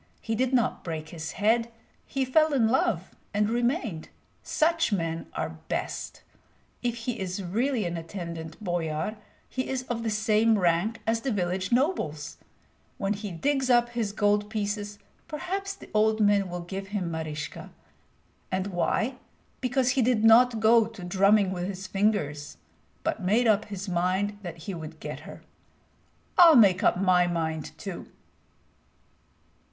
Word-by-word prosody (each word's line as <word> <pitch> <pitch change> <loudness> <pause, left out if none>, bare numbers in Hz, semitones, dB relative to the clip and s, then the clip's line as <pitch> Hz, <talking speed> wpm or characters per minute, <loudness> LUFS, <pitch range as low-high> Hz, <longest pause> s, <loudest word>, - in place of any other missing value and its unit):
He 225 - -3
did 255 +3 +1
not 245 -3 +1
break 160 -2 -5
his 160 -1 -6
head; 230 +3 +2 0.4
he 270 -1 -1
fell 310 +4 +3
in 230 -4 +4
love 220 -7 +1 0.2
and 210 0 +3
remained. 240 - -1 0.3
Such 330 -2 +1
men 165 -4 -2
are 160 0 -4
best. - - -4 0.6
If 240 -1 -1
he 245 -2 -2
is 190 +1 -3
really 225 +5 0
an 175 0 -2
attendant 165 -2 -6
boyar, 175 +2 -2 0.3
he 260 - -3
is 260 -1 -2
of 240 -2 -3
the 230 - -1
same 215 +1 +3
rank 180 +5 +1
as 225 +1 +1
the 270 - -1
village 185 -2 -1
nobles. 240 - 0 0.6
When 195 +1 0
he 210 0 -5
digs 270 - 0
up 240 -1 +4
his 230 -4 -2
gold 205 0 +1
pieces, 205 -1 -3 0.3
perhaps 385 +5 -4
the - - -14
old 215 +1 +3
man 205 -2 +3
will 175 0 -4
give 195 +3 -6
him 190 -4 -3
Maryska. 155 -2 -5 0.8
And 185 0 0
why? 225 +8 0 0.4
Because 255 0 +1
he 265 - +2
did 235 -2 +2
not 230 +1 +6
go 225 0 +5
to 225 -5 -11
drumming 195 +2 +3
with 180 -1 -3
his 190 -1 -6
fingers, 185 -8 -1 0.5
but - - -1
made 210 +7 +2
up 215 -2 +3
his 200 -1 -6
mind 185 +3 0
that 170 -4 -8
he 195 - -4
would 160 -2 -8
get - - -6
her. - - -11 1.0
I'll 335 -3 +9
make 195 -6 +6
up - - +3
my 180 -2 +4
mind 160 -3 -3
too." 195 -3 -7
205 Hz, 155 wpm, -27 LUFS, 175-235 Hz, 1.0 s, I'll